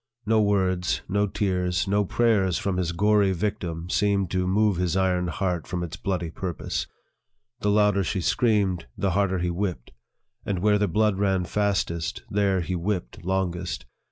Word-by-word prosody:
No 110 0 +3
words, 95 -3 +1
no 100 +2 +1
tears, 90 -2 0
no 100 +1 +2
prayers, 100 -5 +2
from 95 -2 -1
his 90 -2 0
gory 100 +2 +3
victim, 90 -4 -3
seemed 100 -3 +1
to 90 0 0
move 105 0 +2
his 90 0 0
iron 90 -2 +1
heart 90 -1 -2
from 90 -1 -3
its 85 - -5
bloody 90 -5 -3
purpose. 90 -1 -4 0.7
The 105 - 0
louder 105 -1 +3
she 95 +2 -1
screamed, 100 - +1
the 100 - 0
harder 95 0 +1
he 90 0 -1
whipped; 90 -8 -3 0.5
and 100 - -2
where 105 +3 +3
the 105 - +2
blood 105 +2 +1
ran 95 -3 +1
fastest, 95 -5 -1
there 100 -2 +2
he 85 +2 -3
whipped 90 -6 -3
longest. 90 -1 -2
95 Hz, 160 wpm, -25 LUFS, 90-105 Hz, 0.7 s, No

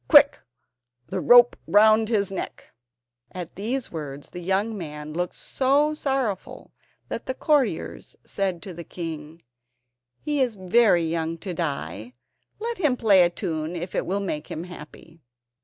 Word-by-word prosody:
Quick! 290 -2 +7 0.7
the - - -2
rope 245 0 +7
round 215 +1 +5
his 200 -4 +1
neck." 190 - -6 0.6
At 180 -3 -6
these 235 +7 -3
words 145 -3 -7
the 180 - -7
young 195 +5 0
man 150 -4 -7
looked 175 +2 -2
so 285 +3 +1
sorrowful 270 -9 -3 0.4
that - - -5
the 260 - -2
courtiers 295 -3 0
said 190 -4 -2
to 190 -4 -7
the 170 +1 -8
king: 165 -1 -7 0.8
"He 295 -2 -1
is 245 -4 +1
very 190 -1 +4
young 165 0 -2
to 185 - -3
die. 140 - -4 0.4
Let 465 0 -4
him 295 -8 +2
play 205 -5 +5
a 175 - +5
tune 160 -1 -4
if 175 +1 -5
it - - -1
will 195 +2 0
make 155 -6 -4
him 160 - -5
happy." 165 -1 -12
185 Hz, 150 wpm, -25 LUFS, 165-240 Hz, 0.8 s, Quick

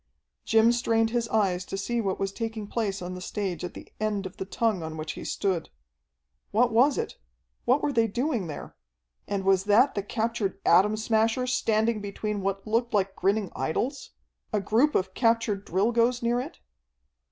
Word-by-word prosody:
Jim 225 +1 +5
strained 225 -2 +1
his 235 -1 0
eyes 190 -5 +1
to 195 - -5
see 235 +4 -1
what 195 -3 -2
was 195 0 -1
taking 225 0 -4
place 200 -3 -2
on 180 +1 -5
the 180 - -7
stage 185 -4 -3
at 180 - -5
the - - -11
end 210 -2 -1
of 185 - -8
the 190 - -4
tongue 215 -1 0
on 160 0 -6
which 155 0 -4
he - - -8
stood. 185 -5 -1 0.8
What 235 +3 +3
was 265 +5 +4
it? 455 - -4 0.5
What 255 +4 +3
were 290 - +1
they 230 -2 +3
doing 235 - -1
there? 150 - -8 0.5
And 200 -1 -2
was 195 0 +3
that 220 +7 +5
the 200 - -1
captured 220 -1 -2
Atom 205 +5 +5
Smasher 225 +2 +1
standing 225 -3 +1
between 205 +1 -3
what 195 0 -2
looked 230 +2 0
like 195 -1 +1
grinning 200 0 0
idols? 230 - -2 0.4
A 210 - +1
group 240 +9 +2
of 185 0 0
captured 230 -4 +1
Drilgoes 235 +6 +2
near 240 +1 +2
it? 250 - -6
215 Hz, 180 wpm, -27 LUFS, 195-235 Hz, 0.8 s, Jim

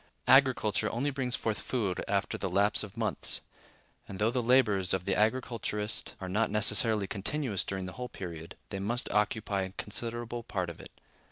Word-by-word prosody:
Agriculture 130 -6 +4
only 135 +5 -1
brings 130 -3 -1
forth 110 -2 -1
food 105 -8 -1
after - - 0
the - - -2
lapse 100 +1 +3
of 105 -3 -7
months; - - -1 0.7
and, 95 - -7
though 110 +3 +2
the 125 0 0
labors 110 -7 +4
of 95 -1 -4
the 95 - +1
agriculturist 110 -2 -1
are 95 - -5
not 105 +5 +1
necessarily 105 0 +3
continuous 105 +3 -1
during 95 -1 -4
the 90 - -5
whole 125 +5 -6
period, 85 -3 -7
they 100 - -4
must 115 +6 -1
occupy 105 -1 +1
a 95 0 -4
considerable 120 +3 -3
part 95 -6 -3
of 85 - -13
it. - - -10
105 Hz, 175 wpm, -31 LUFS, 95-120 Hz, 0.7 s, Agriculture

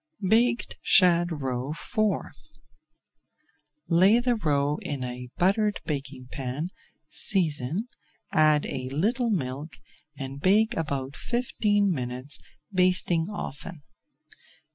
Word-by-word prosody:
BAKED 235 +3 +2
SHAD 175 -4 +4
ROE 130 +2 -2
IV 165 - -12 1.9
Lay 185 +6 +5
the 245 0 +1
roe 145 -6 0
in 140 -3 -4
a 125 0 -6
buttered 205 +3 +2
baking 135 -3 -5
pan, 135 +5 -4 0.4
season, 165 - +1 0.5
add 155 -1 +4
a 130 -1 -3
little 225 - 0
milk, 145 - -3 0.4
and 135 +1 -6
bake 215 +6 +3
about 140 -3 -3
fifteen 210 -4 0
minutes, 130 0 -2 0.3
basting 180 -2 +3
often. 170 -5 -7
160 Hz, 100 wpm, -26 LUFS, 135-200 Hz, 1.9 s, Lay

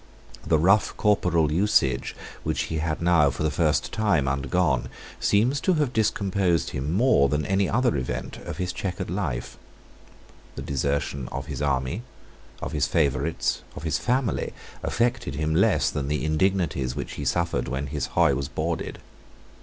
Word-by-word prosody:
The 80 - +3
rough 95 +6 +3
corporal 90 -7 +2
usage 85 -6 +2 0.3
which - - -1
he 80 - 0
had 80 +1 -2
now, 85 -4 +5
for 70 +3 -4
the 80 - +1
first 75 -3 +1
time, 100 -11 +2
undergone, 65 +1 +1 0.3
seems 125 +7 +2
to 185 - +2
have 145 -5 0
discomposed 100 -6 +1
him 70 +4 -3
more 95 - +4
than 75 +1 0
any 95 +2 +1
other 120 - +2
event 60 -2 -3
of - - -7
his 90 -1 -2
chequered 90 -2 -4
life. 80 -11 -3 1.0
The - - -5
desertion 70 -1 -1
of - - -4
his - - -5
army, 70 - 0 0.6
of - - -3
his - - +1
favourites, 75 0 0
of 70 - -8
his 80 +1 0
family, 125 -1 0 0.3
affected 115 - 0
him 75 +1 -1
less - - +3
than 70 -2 -3
the 75 +1 -1
indignities 80 -6 0
which - - -4
he 70 - -5
suffered 80 -2 0
when 65 +3 -2
his 70 -1 -3
hoy - - +3
was 70 -1 -2
boarded. 80 +3 -3
80 Hz, 160 wpm, -25 LUFS, 70-95 Hz, 1.0 s, now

